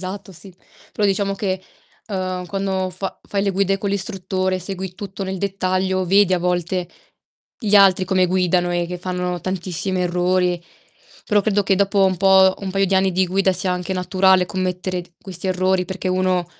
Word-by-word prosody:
Esatto, 195 +1 -5
sì. 185 +2 -13 0.4
Però 210 - +1
diciamo 195 0 0
che, 190 -2 -3 0.5
uhm, 185 -2 -3
quando 190 0 -2
fa 185 +1 -6
fai 200 -1 -1
le 200 - +1
guide 195 0 +1
con 200 0 -2
l'istruttore, 190 -2 -1
segui 185 0 -5
tutto 195 0 -6
nel 190 0 -4
dettaglio, 185 -1 -1
vedi 195 +1 +4
a 180 - +3
volte 180 0 -1 0.7
gli 210 -4 0
altri 195 -2 +6
come 185 -1 +2
guidano 180 -1 +1
e 175 0 0
che 180 +1 -6
fanno 180 0 -3
tantissimi 185 +1 -2
errori. 180 0 +1 0.6
Però, 210 -1 +3
credo 205 0 +1
che 195 0 +2
dopo 195 0 +2
un 190 -1 +2
po', 190 0 +5
un 195 -1 -4
paio 195 +1 +1
di 195 - 0
anni 190 0 +2
di 185 +1 +2
guida 190 +1 +2
sia 185 0 +2
anche 180 +1 -3
naturale 185 0 +3
commettere 185 0 -3
d 175 - -21
questi 185 -1 -6
errori, 185 0 +1
perché 185 +1 -4
uno 185 -1 +1
185 Hz, 180 wpm, -20 LUFS, 180-195 Hz, 0.7 s, altri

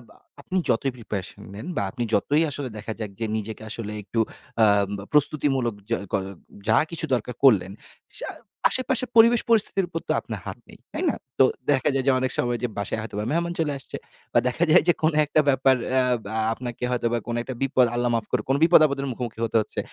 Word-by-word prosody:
আ - - -23 0.2
আপনি 185 - -3
যতই 135 +4 +1
প্রিপারেশন 100 -5 -6
নেন 105 +10 -8
বা - - +2
আপনি 120 - -3
যতই 145 +10 +3
আসলে 140 -2 -5
দেখা 105 +1 -6
যাক 105 -3 -4
যে 115 - -1
নিজেকে 110 +1 -6
আসলে 110 -1 -5
একটু 105 +4 -3 0.5
আম 100 -1 +3 0.2
প্রস্তুতিমূলক 135 -5 +2
যা 115 - +1
ক - - +1 0.5
যা 110 - +4
কিছু 165 -1 -3
দরকার 125 0 -1
করলেন, 100 -9 +5 0.5
সা - - -5 0.4
আশেপাশে 255 -1 +1
পরিবেশ 230 +1 +7
পরিস্থিতির 210 -4 +4
উপর 165 - -3
তো - - 0
আপনার - - -6
হাত - - -6
নেই, - - -14
তাই - - -3
না? - - -1 0.2
তো - - +8 0.3
দেখা 135 0 +2
যায় 135 -1 0
যে - - +6
অনেক 130 0 -1
সময় 120 0 0
যে - - +2
বাসায় 100 +2 -2
হয়তোবা 105 -1 -5
মেহমান 170 +2 0
চলে 155 -2 +1
আসছে। 135 - -9 0.4
বা - - +6
দেখা 125 +7 0
যায় 175 - +7
যে 175 - +6
কোনো 160 -1 +2
একটা 155 +1 +3
ব্যাপার 135 -1 +4 0.2
অ্যা 130 0 +3 0.2
বা 105 - -6 0.2
আপনাকে 120 0 -7
হয়তোবা 120 -1 0
কোন 120 - -2
একটা 130 - -6
বিপদ, 130 -2 +3
আল্লাহ 120 0 +1
মাফ 115 -2 -1
করুক 115 -4 0
কোন 135 - +3
বিপদ-আপদের 155 -5 +5
মুখোমুখি 120 -2 -6
হতে 115 - -6
হচ্ছে। 105 - -6
125 Hz, 205 wpm, -24 LUFS, 115-150 Hz, 0.5 s, তো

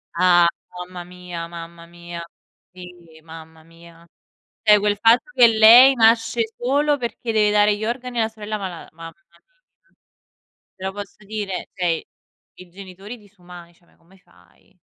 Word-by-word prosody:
Ah 175 -1 +4 0.3
mamma 180 0 -8
mia, 180 -1 -9
mamma 170 0 -11
mia. 170 0 -10 0.5
Sì, 180 -1 -12 0.3
mamma 160 0 -14
mia. 165 +1 -19 0.6
Cioè 210 - +7
quel 205 0 -1
fatto 230 - +2
che 240 - +6
lei 230 +4 +7
nasce 225 0 +2 0.2
solo 285 +4 0
perché 235 -2 -5
deve 210 -1 +2
dare 210 0 +3
gli 215 +1 -5
organi 245 +1 -4
alla 220 0 0
sorella 215 -1 -7
mala 185 -4 -8
mamma 165 0 -11 0.2
mia. 170 - -27 1.4
Te 190 - -14
lo 190 - -3
posso 205 0 -11
dire? 205 -2 -6
Cioè, 180 -2 -3
i 165 - -5 0.5
i 185 -1 -15
genitori 195 +5 -11
disumani, 180 -4 -16
cioè, 170 - -31
ma - - -31
come 180 +3 -25
fai. 90 - -28
190 Hz, 155 wpm, -20 LUFS, 170-220 Hz, 1.4 s, Cioè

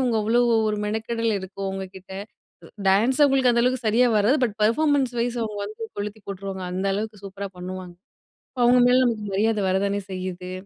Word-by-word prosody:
அவுங்க 245 -3 +1
அவ்ளோ 230 +3 +3 0.3
ஒரு 210 - -1
மெனக்கெடல் 225 +2 -1
இருக்கும் 195 +1 -6
அவங்கக்கிட்ட. 190 0 -8 0.5
உ - - -12 0.2
டான்ஸ் 230 +8 +3
அவுங்களுக்கு 270 -3 +4
அந்த 235 0 +2
அளவுக்கு 250 -2 0
சரியா 240 +3 +4
வராது. 240 +9 +3
பட் 215 -3 -3
பெர்ஃபார்மன்ஸ் 270 +2 +2
வைஸ் 240 +1 -1
அவுங்க 210 -2 -5
வந்து 215 +2 -9 0.2
கொளுத்தி 205 +1 -5
போட்டுருவாங்க. 195 -1 -5
அந்த 190 +2 -2
அளவுக்கு 210 0 -5
சூப்பரா 195 0 -6
பண்ணுவாங்க. 180 0 -7 0.6
இப்போ 250 - -2
அவுங்க 245 0 +5
மேல 250 +1 +5
நமக்கு 225 -3 -1
மரியாதை 215 +1 +1
வர 185 - +2
தானே 200 0 -1
செய்யுது. 185 0 -5
215 Hz, 180 wpm, -24 LUFS, 195-240 Hz, 0.6 s, அவுங்க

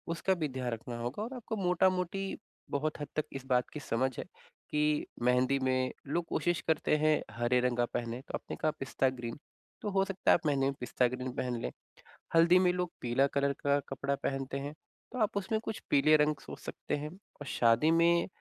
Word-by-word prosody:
उसका 190 +3 +1
भी 160 -4 -1
ध्यान 125 -2 -3
रखना 120 +1 -5
होगा 125 - -3
और 245 +4 -5
आपको 230 -2 -4
मोटा-मोटी 185 0 +1 0.3
बहुत 150 +2 -1
हद 145 - -3
तक 155 - 0
इस 135 -1 -6
बात 125 -1 +2
की 150 - -4
समझ 130 -1 0
है - - -4 0.5
कि 150 0 +2 0.2
मेहंदी 125 +2 +3
में 130 0 +1 0.2
लोग 170 +4 0
कोशिश 175 -2 +1
करते 155 -1 +2
हैं 155 0 +3
हरे 120 +1 +2
रंग 125 -1 +1
का 120 - +3
पहने 120 0 -2
तो - - -9
आपने - - -6
कहा 155 - +3
पिस्ता 135 0 +1
ग्रीन 120 -1 -6 0.4
तो 215 - -2
हो 195 0 +3
सकता 195 -1 +1
है - - +9
आप 160 - -17
मेहंदी 140 -2 +2
में 140 - +1
पिस्ता 125 0 +1
ग्रीन 125 +1 -4
पहन 125 -1 -1
लें। - - -3 0.6
हल्दी 170 +2 +7
में 180 -1 +4
लोग 180 -1 -2
पीला 125 +3 +2
कलर 140 0 +2
का 140 0 +2
कपड़ा 140 +1 -1
पहनते 135 0 -2
हैं, 145 +2 -5 0.4
तो 255 - -3
आप 210 -2 +1
उसमें 215 +3 0
कुछ 220 - -4
पीले 155 +2 +5
रंग 150 0 +3
सोच - - -8
सकते - - -4
हैं 150 +1 -4 0.3
और 145 - -5
शादी 120 +7 +4
में 170 +1 +4
145 Hz, 210 wpm, -32 LUFS, 130-170 Hz, 0.6 s, है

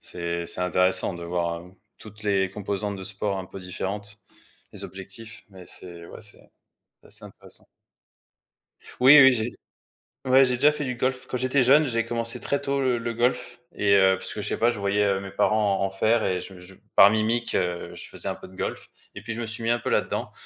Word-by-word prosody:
C'est 85 0 -4
c'est 90 - -3
intéressant 90 +1 +2
de 85 0 -7
voir, 85 -1 -1
hem, 90 +2 -15 0.2
toutes 105 0 -12
les 95 -2 +1
composantes 100 +1 -3
de 95 - -8
sports 100 +1 -2
un 95 -1 -5
peu 95 - -10
différentes, 100 +3 -6 0.5
les - - -6
objectifs, 100 +4 -9
mais 95 -2 -13
c'est 85 -2 -7
ouais, - - -11
c'est - - -5 0.6
c'est - - -18
assez - - -9
intéressant. - - -8 1.3
Oui, 135 +4 +9
oui, 135 0 +8
j'ai 115 -1 -1 0.7
ouais 130 +1 +6
j'ai 125 -1 0
déjà 145 +4 +5
fait 150 - -3
du 125 -2 -3
golf. 130 +1 -1
Quand 125 - -2
j'étais 130 +1 +2
jeune 145 +4 +5
j'ai 115 -2 0
commencé 115 +1 -1
très 140 - 0
tôt 140 0 -1
le 125 -2 +1
le 115 0 -3
golf 125 +1 -1
et 100 -1 +2
heu, 95 -1 +5
puisque - - -3
je - - -3
sais - - -1
pas, 120 - +4
je 115 -4 -3
voyais, 100 +1 +1
heu, 100 -1 +1
mes 95 -1 -8
parents 105 -1 +2
en - - +2
en 95 - -3
faire 110 +3 +2
et 90 -1 0
je 95 -2 -10
je 90 +2 -13 0.2
par 100 - +9
mimique, 110 +2 0
heu, 90 -1 -2
je - - -8
faisais - - -6
un - - -2
peu - - -12
de 95 - -16
golf - - -5 0.3
et - - -7
puis 110 +3 -6
je 115 - -6
me - - -3
suis 110 +1 -5
mis 115 - 0
un 120 0 +2
peu - - -4
là-dedans, - - -1
105 Hz, 225 wpm, -25 LUFS, 95-120 Hz, 1.3 s, Oui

